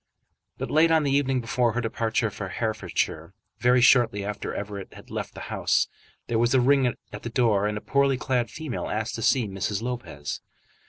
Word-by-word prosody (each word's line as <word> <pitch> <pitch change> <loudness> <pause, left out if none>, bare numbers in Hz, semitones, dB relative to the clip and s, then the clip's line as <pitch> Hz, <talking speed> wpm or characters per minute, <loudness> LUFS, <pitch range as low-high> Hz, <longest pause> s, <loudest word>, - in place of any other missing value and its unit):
But - - -4
late 160 +2 +5
on 160 -1 +4
the 140 - +1
evening 135 -2 +2
before 120 0 +1
her 120 - -1
departure 115 -1 0
for 95 -2 -6
Herefordshire, 110 -5 -2 0.2
very 125 +1 +4
shortly 115 -5 +4
after 105 0 -4
Everett 100 -1 -6
had - - -14
left - - -5
the - - -7
house, - - +2 0.4
there 115 -2 0
was 120 +2 +3
a - - +6
ring 135 +1 +4 0.3
at 105 - -6
the 120 - -5
door, 110 -5 +2
and 105 0 -2
a - - -5
poorly 140 0 +2
clad 125 -3 0
female 155 -6 -5
asked 110 +1 -2
to 115 - -4
see 115 0 +3
Mrs. 100 +2 -2
Lopez. 120 - -5
120 Hz, 195 wpm, -26 LUFS, 105-130 Hz, 0.4 s, a